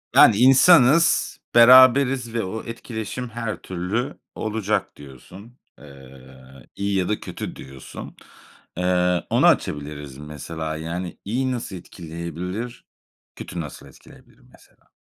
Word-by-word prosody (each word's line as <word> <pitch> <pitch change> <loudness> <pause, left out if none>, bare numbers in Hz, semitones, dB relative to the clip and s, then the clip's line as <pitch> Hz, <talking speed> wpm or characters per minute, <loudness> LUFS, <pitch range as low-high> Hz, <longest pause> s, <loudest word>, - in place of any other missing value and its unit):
Yani 110 - +7
insanız, 135 +5 +5 0.2
beraberiz 130 0 +6
ve 115 - -1
o 110 +4 -5
etkileşim 115 +1 -6
her 115 -2 -5
türlü 95 +10 -4 0.2
olacak 110 -1 -2
diyorsun. 90 - -14 0.2
Eee, 65 -1 -15
iyi 100 0 -2
ya 90 - -1
da 105 - -1
kötü - - -7
diyorsun. 65 0 -11 0.6
Eee, 90 -1 +1
onu - - +2
açabiliriz 75 -2 -1
mesela, 80 +2 -6
yani, 85 +3 -5
iyi 130 +5 -1
nasıl 120 -6 -5
etkileyebilir, 85 +6 -7 0.5
kötü 85 - -6
nasıl 75 -4 -10
etkileyebilir - - -19
mesela? - - -24
95 Hz, 110 wpm, -22 LUFS, 80-120 Hz, 0.6 s, Yani